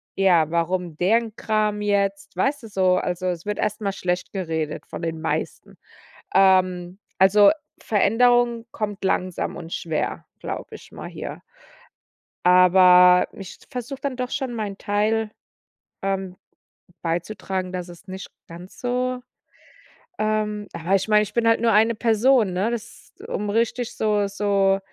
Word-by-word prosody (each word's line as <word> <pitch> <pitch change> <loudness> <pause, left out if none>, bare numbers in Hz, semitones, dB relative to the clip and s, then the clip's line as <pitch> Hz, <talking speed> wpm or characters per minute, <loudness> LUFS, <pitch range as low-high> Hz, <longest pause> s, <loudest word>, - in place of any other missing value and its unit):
ja, 175 -5 +3
warum 170 -1 -1
deren 220 +4 +1
Kram 215 -2 0
jetzt 200 -2 -1
weißt 275 +8 0
du - - -8
so 185 -2 +2
also, 180 +1 -2
es 175 -1 -3
wird 210 0 -3
erstmal 210 -1 -1
schlecht 180 -1 -2
geredet 160 -5 -3
von - - -8
den 160 -1 -3
meisten. - - -4 0.6
Ähm, 185 -1 +3 0.2
also, 200 +2 +6 0.3
Veränderung 235 +2 +3
kommt 210 -3 -4
langsam 185 -1 -1
und 170 -1 -9
schwer, 160 -2 -3
glaube - - -6
ich - - -17
mal - - -8
hier. - - -7 1.0
Aber, 180 0 +7
ich 195 -2 -10
versuche 260 +1 -6
dann 275 -3 -3
doch 250 -1 -3
schon 265 -3 -3
meinen 210 -4 -4
Teil, 215 +2 0 0.7
ähm, 195 -1 -3 0.7
beizutragen, 185 +2 -3
dass 180 -1 -5
es 175 +3 -14
nicht 190 0 -8 0.2
ganz 175 +3 -12
so 250 0 -1 1.0
ähm, 210 -1 -1
aber 170 +4 -1
ich 195 +2 -3
meine, 210 0 +5
ich 210 - -5
bin 230 -1 +2
halt 230 - +3
nur 230 - +3
eine 225 +3 +4
Person, 230 -1 +3
ne? 190 +5 0
Das 235 -3 -8
um 210 0 -3
richtig 230 +2 -1
so 210 -2 +1
so, 200 -1 +1
200 Hz, 140 wpm, -23 LUFS, 180-220 Hz, 1.0 s, Aber